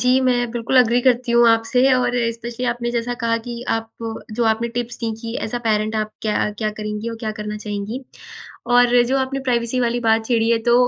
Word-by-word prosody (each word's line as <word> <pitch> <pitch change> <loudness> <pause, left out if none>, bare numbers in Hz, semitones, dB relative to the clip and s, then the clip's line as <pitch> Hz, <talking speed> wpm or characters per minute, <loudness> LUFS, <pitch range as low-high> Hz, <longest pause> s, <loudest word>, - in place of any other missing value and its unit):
जी 255 +1 +4
मैं 245 -1 +1
बिल्कुल 240 +2 -1
अग्री 245 0 +4
करती 245 -1 +2
हूँ 235 0 +6
आपसे 250 +4 +3
और 250 -1 +2 0.2
स्पेशली 235 +2 -6
आपने 240 0 -1
जैसा 240 0 -2
कहा 230 0 +2
कि 240 0 -5
आप 225 0 -1 0.4
जो 235 +2 0
आपने 225 +1 +1
टिप्स 240 -1 -3
दीं 225 -2 -2
कि 230 0 -6
एज़ 220 - -4
अ - - -1
पैरेंट 215 0 +1
आप 215 0 -1
क्या 215 -1 0
अ, - - -2
क्या 215 -1 0
करेंगी 210 +1 -5
और 230 - -5
क्या 220 -2 -2
करना 210 0 -4
चाहेंगी। 210 +3 -5 0.7
और 245 0 +5
जो 270 +1 +2
आपने 270 +1 -2
प्राइवेसी 245 -1 0
वाली 240 0 0
बात 225 -1 +2
छेड़ी 230 -2 +2
है 230 - +3
तो 235 - +6
235 Hz, 220 wpm, -20 LUFS, 225-245 Hz, 0.7 s, हूँ